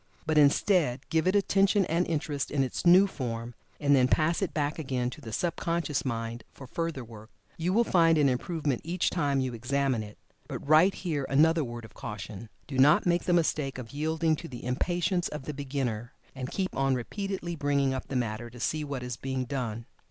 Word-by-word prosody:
But, 155 -1 +3
instead, 145 -2 +3
give 160 +1 +2
it 185 - +3
attention 195 0 +3
and 170 +2 0
interest 150 -3 -2
in 140 -2 +1
its 130 +6 -2
new 185 +3 +8
form, 120 -9 -4 0.3
and 145 -1 +4
then 130 -2 +4
pass 160 +7 +2
it 195 - 0
back 150 +1 -1
again 130 -4 -2
to - - -10
the 110 - -8
sub 170 +9 -1
conscious 165 -4 -1
mind 115 -2 -3
for 135 - -11
further 165 0 -3
work. 110 -1 -12 0.3
You 170 +2 -1
will 230 +5 +4
find 165 -6 +4
an 145 -2 +4
improvement 140 +1 -1
each 175 +2 0
time 145 -5 +1
you 130 -1 -2
examine 130 +1 0
it. 105 -1 -9 0.3
But, - - -6
right 155 +6 +6
here 155 -7 -2
another 160 +3 +4
word 120 -2 -6
of 105 - -14
caution. 105 +1 -7 0.2
Do 135 -3 -4
not 145 +3 +6
make 175 0 +2
the - - +1
mistake 155 -5 +1
of 120 -3 -8
yielding 160 +2 +1
to 170 - -8
the 125 -5 -9
impatience 175 +7 0
of 150 -2 -6
the 150 - -5
beginner, 130 -5 -3 0.2
and 130 -1 -5
keep 190 -1 -2
on 135 -1 +2
repeatedly 180 - -4
bringing 140 -2 +1
up 130 - -4
the 135 - -5
matter 120 -1 -2
to 120 +1 -13
see 155 +5 -1
what 140 -3 -4
is 125 -2 -5
being 130 0 -3
done. 120 -4 -4
140 Hz, 205 wpm, -28 LUFS, 125-165 Hz, 0.3 s, new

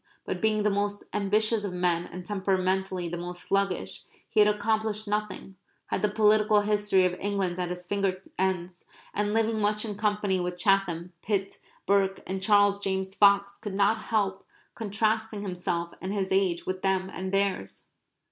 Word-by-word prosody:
But, - - -4
being 215 -1 +2
the 210 - +2
most 205 0 -1
ambitious 210 +2 +2
of 200 -3 -3
men 175 -1 0
and 180 +1 -8
temperamentally 190 -2 0
the 175 +1 -4
most 175 +1 -7
sluggish, 195 -1 -1 0.2
he 220 - 0
had 210 0 +7
accomplished 215 0 -1
nothing; 205 -2 -3 0.3
had - - 0
the 210 - +2
political 210 0 +4
history 205 -2 +2
of 180 - +1
England 195 -3 -1
at 180 -1 -1
his 180 0 -5
finger 195 -1 -1 0.2
ends, 185 -1 -1 0.3
and 205 0 0
living 225 0 +1
much 210 +1 +1
in 210 - -3
company 205 -2 0
with 180 0 -3
Chatham, 180 -2 +1
Pitt, 195 -2 -2 0.3
Burke, 195 0 +2
and 190 0 -4
Charles 205 0 +4
James 190 -1 -2
Fox 200 0 +4
could 205 -4 -5
not 205 +2 +2
help 195 -3 0 0.3
contrasting 220 0 -1
himself 175 -2 -3
and 185 - -3
his 195 -2 -2
age 190 -3 +1
with 185 0 -3
them 190 0 0
and 190 +1 -4
theirs. 195 - -1
195 Hz, 165 wpm, -27 LUFS, 185-210 Hz, 0.3 s, had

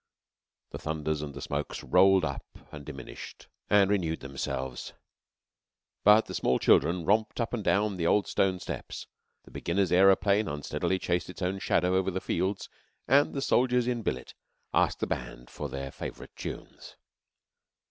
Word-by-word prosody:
The - - -6
thunders 80 -1 -2
and 70 -2 -6
the 70 - -7
smokes 70 +1 -4
rolled 95 +7 +5
up 70 - -4 0.3
and 75 -1 -9
diminished 65 -3 -9 0.2
and 100 -2 +5
renewed 85 -5 0
themselves, 65 -1 -5 1.1
but 105 +2 +6
the - - -8
small 65 - +1
children 85 +3 +3
romped 110 +6 +1
up 115 0 -2
and 115 -4 -2
down 100 0 +1
the 85 -1 0
old 105 +2 +3
stone 95 -1 +1
steps; - - -6 0.4
the - - -17
beginner's 95 +3 -1
aeroplane 95 +3 +4
unsteadily 75 +5 -2
chased 90 -1 -1
its 90 - -7
own 95 +2 -1
shadow 90 -3 +1
over 95 0 +2
the 95 0 -2
fields; 95 +3 -2 0.4
and 145 +2 +4
the 135 - -1
soldiers 125 -2 +2
in 120 -1 -1
billet - - -4 0.4
asked - - +2
the - - +2
band - - -6
for 75 - -5
their 70 +1 -5
favourite - - -8
tunes. - - -8
90 Hz, 160 wpm, -29 LUFS, 75-100 Hz, 1.1 s, but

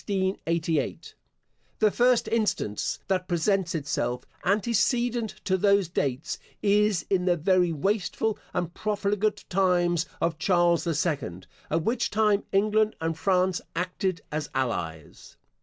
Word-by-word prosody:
* - - -29
The 170 -6 -1 0.9
first 245 -1 +3
instance 210 - -1
that 185 -1 0
presents 180 0 +1
itself, 125 -5 -2 0.2
antecedent 235 +3 +1
to 190 -1 +1
those 200 -2 +3
dates, 140 -5 -2 0.2
is 205 -3 +3
in 180 -2 +2
the 175 -1 +3
very 180 +1 +3
wasteful 205 +6 -1
and 170 -1 -2
profligate 210 0 -1
times 175 -3 +2
of 165 -1 -1
Charles 175 -2 +3
the 165 -2 0
Second; 140 - -2 0.2
at 160 +1 0
which 235 +4 0
time 210 -1 +2
England 215 +2 +2
and 165 0 -1
France 185 +1 +1
acted 180 +1 -2
as 155 0 -3
allies. 85 - -4
185 Hz, 125 wpm, -26 LUFS, 165-205 Hz, 0.9 s, first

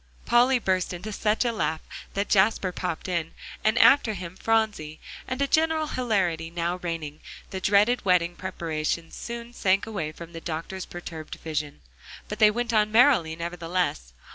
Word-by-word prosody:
Polly 250 +2 +5
burst 185 -5 0
into 185 +5 -6
such 215 +4 +1
a 240 - +2
laugh 160 -8 -1 0.4
that 200 +1 0
Jasper 195 -1 +3
popped 180 -2 -4
in, 170 -3 -2 0.3
and 215 +2 +2
after 235 -6 +6
him, 180 -1 -7
Phronsie, 210 -8 0 0.3
and 255 0 -3
a - - +1
general 315 +1 +2
hilarity 190 - 0
now 170 +1 -2
reigning, 165 -4 -5 0.3
the 190 - -4
dreaded 210 +6 +3
wedding 175 -2 +2
preparations 165 -3 -3
soon 235 0 -7
sank 195 -3 +2
away 185 -9 -3
from 170 +2 -11
the 165 - -7
doctor's 170 +4 -5
perturbed 165 -3 -7
vision. 150 - -4 0.5
But 210 - -6
they 215 - +8
went 235 +2 -2
on 215 -1 +3
merrily 225 - +5
nevertheless. 170 - -2
185 Hz, 160 wpm, -26 LUFS, 165-220 Hz, 0.5 s, they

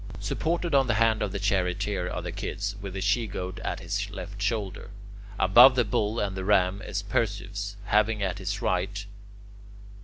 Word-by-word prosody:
Supported 170 0 -1
on 135 -2 +4
the 120 - +2
hand 110 0 +3
of 105 -2 -1
the 100 - -3
Charioteer 95 -1 0
are - - -4
the - - -4
Kids, 100 0 -4
with 95 -1 -6
the 95 - -3
She 115 +4 +1
Goat 95 -2 -5
at - - -3
his - - -2
left 100 0 -8
shoulder. 105 -3 -2 0.5
Above 120 +8 +8
the 125 -2 +3
Bull 105 +2 0
and 100 -2 -1
the 95 - -4
Ram 95 -1 +2
is - - -4
Perseus, 100 0 -2
having 105 0 +2
at 95 -2 -2
his - - -3
right... 95 +3 -1
100 Hz, 180 wpm, -27 LUFS, 95-110 Hz, 0.5 s, Above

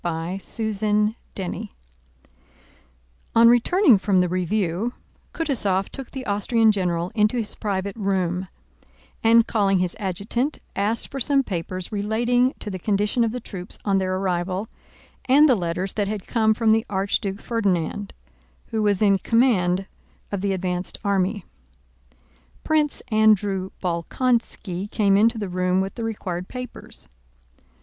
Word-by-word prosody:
CHAPTER 175 +6 -4 0.7
III 195 +2 -4 1.6
On 230 0 +7
returning 245 - +5
from 195 -1 +2
the 180 - +3
review, 185 +4 -1 0.4
Kutúzov 210 - 0
took 270 -2 -8
the 265 -1 -7
Austrian 220 +2 +3
general 180 -3 -1
into 215 +2 +2
his 225 -3 -2
private 200 -1 -3
room 190 -3 -1 0.8
and, 230 0 +6
calling 200 -4 +2
his 180 -1 -1
adjutant, 215 - -2 0.2
asked 210 +3 -1
for 275 - -4
some 275 +1 +2
papers 185 -2 -4
relating 235 +5 +1
to 210 - -5
the 185 - -5
condition 210 +5 +1
of 225 - 0
the 250 - -4
troops 190 -5 -8
on 195 -2 +2
their 185 0 -1
arrival, 185 +2 -1 0.6
and 285 +4 +6
the 265 - +5
letters 180 0 -2
that 205 -2 -1
had 205 -2 -4
come 220 -2 +2
from 225 -1 +2
the 220 0 +3
Archduke 195 0 -1
Ferdinand, 205 -4 -1 0.6
who 220 - -1
was 205 -1 +2
in 200 -2 +4
command 195 -6 +2 0.5
of 200 -2 -2
the 200 0 0
advanced 180 -1 -3
army. 200 -1 0 1.2
Prince 305 -2 +1
Andrew 205 -3 +3
Bolkónski 190 +1 -1
came 200 -2 +2
into 225 +3 +4
the 205 -2 -3
room 180 0 0
with 190 +1 -2
the 230 - -5
required 185 -5 -4
papers. 250 0 -9
200 Hz, 135 wpm, -23 LUFS, 185-225 Hz, 1.6 s, On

